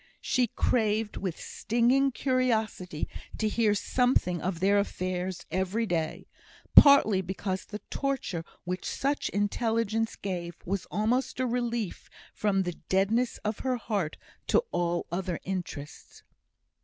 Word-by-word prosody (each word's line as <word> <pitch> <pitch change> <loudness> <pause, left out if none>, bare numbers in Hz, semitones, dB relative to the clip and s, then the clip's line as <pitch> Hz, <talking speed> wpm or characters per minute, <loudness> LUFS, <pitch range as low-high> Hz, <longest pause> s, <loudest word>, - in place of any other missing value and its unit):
She 250 -1 +2
craved 215 -1 +1
with 185 -4 -3
stinging 250 +4 +2
curiosity 220 - 0 0.3
to 220 - +1
hear 215 -1 +2
something 205 -6 +1
of 180 -2 -2
their 200 +2 +4
affairs 185 -2 -3
every 190 +5 0
day; 165 -5 -2 0.5
partly 250 -9 +8
because 190 +1 -3
the 210 0 -7
torture 270 -12 -2 0.2
which 180 +1 -3
such 280 +2 -1
intelligence 225 +1 0
gave 175 -3 -4
was 195 0 -2
almost 240 +5 0
a 255 - +2
relief 235 -4 -2 0.2
from 195 -2 +1
the 175 -1 -3 0.2
deadness 215 +6 +2
of 210 0 -1
her 255 -1 0
heart 200 -9 -2 0.3
to - - +4
all 175 0 0
other 180 0 -2
interests. 175 -6 -6
205 Hz, 125 wpm, -29 LUFS, 185-235 Hz, 0.5 s, partly